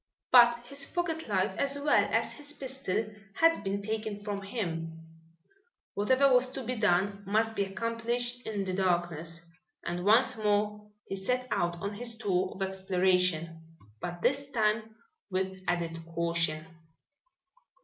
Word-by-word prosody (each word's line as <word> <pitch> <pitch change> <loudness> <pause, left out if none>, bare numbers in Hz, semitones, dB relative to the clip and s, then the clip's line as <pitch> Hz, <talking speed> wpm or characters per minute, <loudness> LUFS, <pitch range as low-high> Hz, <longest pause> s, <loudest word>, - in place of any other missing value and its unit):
But 240 -1 +8
his 280 +2 -3
pocket 330 -4 -2
light 195 -1 +1
as 280 0 +1
well 290 +1 +4
as - - +1
his 295 0 -6
pistol 265 -7 -2 0.3
had 330 0 +4
been 200 +1 -2
taken 215 -1 -3
from 205 -1 -3
him. 165 -6 -4 1.0
Whatever 260 +6 +4
was 250 0 +4
to 265 - -4
be 250 +2 -2
done, 200 -1 +2
must 220 +2 +2
be 200 - +1
accomplished 230 +4 -2
in 205 -3 -1
the 185 -1 -3
darkness, 175 -3 -1 0.4
and 175 0 -2
once 230 +6 +5
more 210 0 0 0.2
he - - -4
set 250 +6 0
out 175 0 +1
on 200 +1 -3
his 230 +2 -3
tour 185 -3 0
of 195 - -4
exploration, 180 -4 0 0.2
but 175 -1 -5
this 275 +1 +1
time 220 -2 0 0.3
with 190 0 -2
added 170 -1 -1 0.2
caution. 165 -2 0
205 Hz, 140 wpm, -30 LUFS, 180-240 Hz, 1.0 s, But